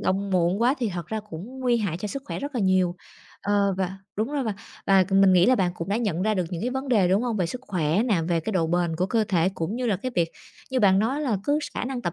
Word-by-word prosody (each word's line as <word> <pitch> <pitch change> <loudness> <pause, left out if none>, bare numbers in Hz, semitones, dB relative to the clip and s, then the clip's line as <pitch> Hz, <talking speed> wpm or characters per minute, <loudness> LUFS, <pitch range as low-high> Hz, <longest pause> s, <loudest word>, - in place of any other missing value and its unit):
động 195 +1 0
muộn 180 +3 +2
quá 255 +4 +4
thì 240 -4 0
thật 175 -3 -5
ra 220 0 -3
cũng 220 +12 -8
nguy 245 -2 +2
hại 200 -8 -1
cho 210 - -4
sức 275 +5 -5
khỏe - - -4
rất 285 0 -5
là 235 - 0
nhiều. 185 -2 +2 0.5
Ờ, 200 -1 +2
và 190 0 -2 0.2
đúng 225 +7 -1
rồi, 285 -3 -1
và 215 -3 -2 0.3
và 195 -1 +5
mình 195 0 +5
nghĩ 180 0 +5
là 255 - +5
bạn 180 -5 +1
cũng 165 +1 -6
đã 200 - +1
nhận 200 -7 -1
ra 215 0 +1
được 185 -3 0
những 175 -2 -4
cái 245 - -1
vấn 265 +2 -4
đề, 210 -8 +3
đúng 195 +5 +2
hông? 235 -3 -1
Về 180 - +1
sức 250 +9 -6
khỏe 175 0 +1
nè, 210 -9 +1
về 170 -2 +1
cái 220 - -4
độ 170 -4 +1
bền 170 -1 0
của 185 +3 0
cơ 225 0 +1
thể 180 -3 +2
cũng 165 +7 -3
như 250 -1 -2
là 205 - +1
cái 255 +7 -5
việc 170 -1 +1 0.4
như 260 -1 +1
bạn 190 -2 +5
nói 255 +8 0
là 250 -9 0
cứ 290 +1 +2 0.2
khả - - -2
năng 250 -1 -4
tập 175 - -2
200 Hz, 295 wpm, -25 LUFS, 180-240 Hz, 0.5 s, và